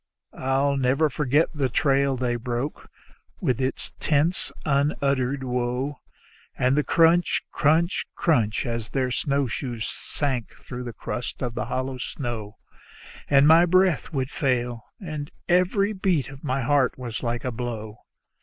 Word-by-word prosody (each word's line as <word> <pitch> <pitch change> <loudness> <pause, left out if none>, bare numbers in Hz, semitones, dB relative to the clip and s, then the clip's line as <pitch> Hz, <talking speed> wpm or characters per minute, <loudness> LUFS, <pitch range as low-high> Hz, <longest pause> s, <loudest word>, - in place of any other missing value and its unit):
I'll 135 +2 +1
never 135 +4 +2
forget 150 +3 +2
the 140 -4 0
trail 135 +1 +2
they 125 -1 0
broke, 120 +4 -4 0.5
with 125 -1 0
its 130 +1 -3
tense, 155 +4 +1
unuttered 140 -2 +1
woe; 125 +2 -2 0.6
And 130 +2 +3
the 150 - +2
crunch, 165 +3 +3
crunch, 165 +4 +2
crunch 115 -11 +1
as 115 -2 -3
their 130 -2 0
snowshoes 125 -4 -1
sank 130 -6 -3
through 125 0 -8
the 120 - -4
crust 115 +5 -5
of 120 -2 -2
the - - -3
hollow 130 0 -3
snow; 115 -6 -5 0.7
And 140 0 +6
my 165 +3 +7
breath 185 -2 +3
would 135 -2 -2
fail, 120 -5 -1
and 155 -6 -5 0.2
every 190 +4 +3
beat 185 - 0
of 135 0 -12
my 135 -2 -1
heart 140 -1 +2
was 120 -3 -5
like 120 0 -2
a 125 - -1
blow. 110 -3 -5
135 Hz, 140 wpm, -25 LUFS, 125-150 Hz, 0.7 s, my